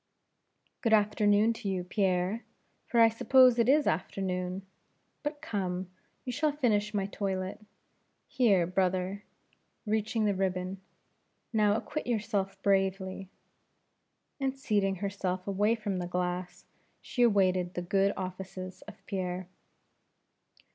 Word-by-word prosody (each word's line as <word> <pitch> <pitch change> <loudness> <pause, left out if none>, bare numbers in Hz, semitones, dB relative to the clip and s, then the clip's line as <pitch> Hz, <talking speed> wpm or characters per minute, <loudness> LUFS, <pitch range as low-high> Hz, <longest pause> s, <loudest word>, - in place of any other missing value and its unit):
"Good 225 -2 +2
afternoon 210 +1 +4
to 225 -3 -5
you, 185 -2 -1
Pierre, 185 +3 0 0.4
for 235 - +1
I 230 - +9
suppose 250 +2 +5
it 235 +1 +3
is 295 +2 +5
afternoon. 185 +2 -2 0.6
But 295 +1 -5
come, 185 - -3 0.3
you 250 - -2
shall 305 +5 +1
finish 215 -7 +1
my 200 -2 0
toilette; 195 0 -3 0.6
here, 205 -9 +3
brother 185 +2 0 0.3
" - - -46
reaching 220 +1 0
the 205 - +2
ribbon 185 0 -2 0.7
"now 210 -2 +3
acquit 300 +6 -4
yourself 205 -4 -1
bravely 190 -1 0 0.5
" - - -49
and 270 0 -1
seating 205 -6 +1
herself 190 -1 -3
away 205 +3 +2
from 210 -4 -3
the 175 - -3
glass, 180 0 -3 0.3
she 245 - -3
awaited 185 -5 +3
the 180 - -2
good 195 +2 +2
offices 185 0 -6
of - - -13
Pierre. 185 -2 -3
195 Hz, 125 wpm, -30 LUFS, 185-220 Hz, 0.7 s, I